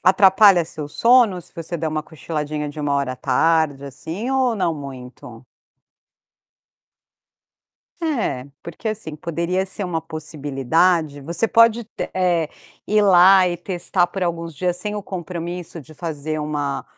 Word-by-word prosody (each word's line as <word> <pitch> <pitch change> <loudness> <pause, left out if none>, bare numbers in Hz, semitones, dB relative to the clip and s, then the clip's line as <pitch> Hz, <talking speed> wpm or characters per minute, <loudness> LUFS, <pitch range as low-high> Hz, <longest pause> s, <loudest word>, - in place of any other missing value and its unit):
Atrapalha 190 -1 +6
seu 150 -2 -7
sono, 230 +2 +4
se - - -12
você 170 +1 -5
der 160 0 -3
uma 155 0 -2
cochiladinha 150 -1 -4
de 145 +1 -7
1 145 -1 -1
hora 140 -2 0
à - - -9
tarde, 160 -2 +1
assim, 165 - -6
ou 260 -3 +2
não 170 -4 0
muito? 130 -3 -10 2.6
É, 240 - -1 0.2
porque, 170 +6 -6
assim, 210 -8 -4
poderia 170 +4 -2
ser 195 +1 -3
uma 170 -3 -2
possibilidade. 155 0 0
Você 170 +10 -1
pode 230 +1 +4
te 220 - -6
eh, 175 -4 +1 0.4
ir 215 +1 +3
lá 190 0 +7
e 175 -1 -1
testar 175 0 -1
por 195 - -5
alguns 170 -1 -3
dias 180 +1 0
sem 210 +4 -3
o 205 - -4
compromisso 175 -1 -6
de 155 +2 -14
fazer 155 -1 -4
uma 145 -2 -3
170 Hz, 145 wpm, -21 LUFS, 150-190 Hz, 2.6 s, lá